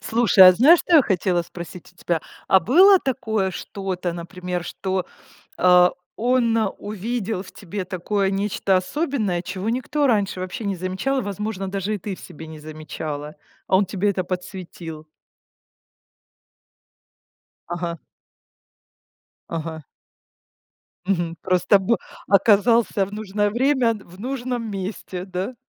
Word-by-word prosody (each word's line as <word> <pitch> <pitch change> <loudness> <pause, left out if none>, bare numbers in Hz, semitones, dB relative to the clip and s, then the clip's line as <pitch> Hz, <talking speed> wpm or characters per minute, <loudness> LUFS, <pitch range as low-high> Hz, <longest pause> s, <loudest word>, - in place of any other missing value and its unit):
Слушай, 220 -5 +6
а - - +8
знаешь, 295 - +6
что 340 - +4
я 290 - +7
хотела 180 -3 +1
спросить 175 +1 -10
у - - -37
тебя? 170 -1 -1 0.3
А 190 - +7
было 370 - +7
такое 220 - -1
что-то, 185 -2 -4
например, 175 +1 -5
что, 190 -1 -3 0.5
а, 180 0 +6 0.2
он 240 -1 +2 0.2
увидел 215 0 -3
в 190 - -12
тебе 195 0 -6
такое 195 +2 -1
нечто 195 -1 +1
особенное, 210 - -1
чего 185 +4 -4
никто 260 +4 0
раньше 205 -7 +1
вообще 185 +6 -5
не 200 - -1
замечал, 190 +10 -1
возможно, 205 -1 -4
даже 195 +2 -2
и - - -3
ты 195 0 -5
в - - -16
себе 160 - -10
не 160 -1 -10
замечала, 150 -1 -6 0.3
а 190 - +3
он 200 - +3
тебе 200 +2 0
это 185 -1 -2
подсветил? 175 -3 -7 2.6
Ага. 170 -1 -4 1.5
Ага. 160 -1 -5 1.2
Мгм, 175 -3 0
просто 185 +2 +3
бы 215 +4 +1 0.3
оказался 205 +1 +4
в 200 - -13
нужное 205 -1 -1
время 260 +1 +2
н 225 - -2
в 180 +2 -14
нужном 245 -2 -3
месте, 190 -2 -5
да? 190 +6 -4
195 Hz, 130 wpm, -22 LUFS, 180-220 Hz, 2.6 s, а